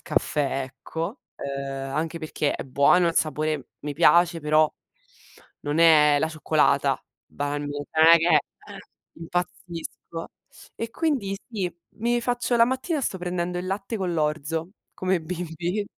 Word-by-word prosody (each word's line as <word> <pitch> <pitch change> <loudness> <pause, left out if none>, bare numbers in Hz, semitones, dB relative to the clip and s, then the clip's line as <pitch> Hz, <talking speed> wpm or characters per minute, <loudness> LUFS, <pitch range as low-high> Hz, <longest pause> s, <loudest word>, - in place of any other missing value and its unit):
caffè, 140 -2 0
ecco. 165 - -6
Ehm, 135 -1 -5
anche 160 +3 -2
perché 155 -2 -1
è - - -4
buono 140 +7 +4
il 165 - -2
sapore 155 -3 0
mi 145 -1 -5
piace, 170 +2 +5
però 155 0 +3 0.9
non 145 +2 -2
è 150 -3 +6
la 160 - +1
cioccolata 155 -1 +2 0.2
banalmente, 145 0 -4
non 160 - +8
è - - +10
che, 165 +2 +1 0.4
ehm, - - -9 0.4
impazzisco. 170 -1 -5 0.5
E 230 0 -4
quindi 255 -11 -1
sì, 190 -6 -2 0.2
mi 240 +2 +1
faccio 245 +1 0
la 230 - +7
mattina 260 +6 -1
sto 190 -7 -2
prendendo 180 0 -2
il 180 - -4
latte 200 +4 -3
con 185 -3 -2
l'orzo 155 +2 -1 0.2
come 185 0 +1
i - - -3
bimbi. 175 +3 -3
165 Hz, 145 wpm, -25 LUFS, 150-185 Hz, 0.9 s, è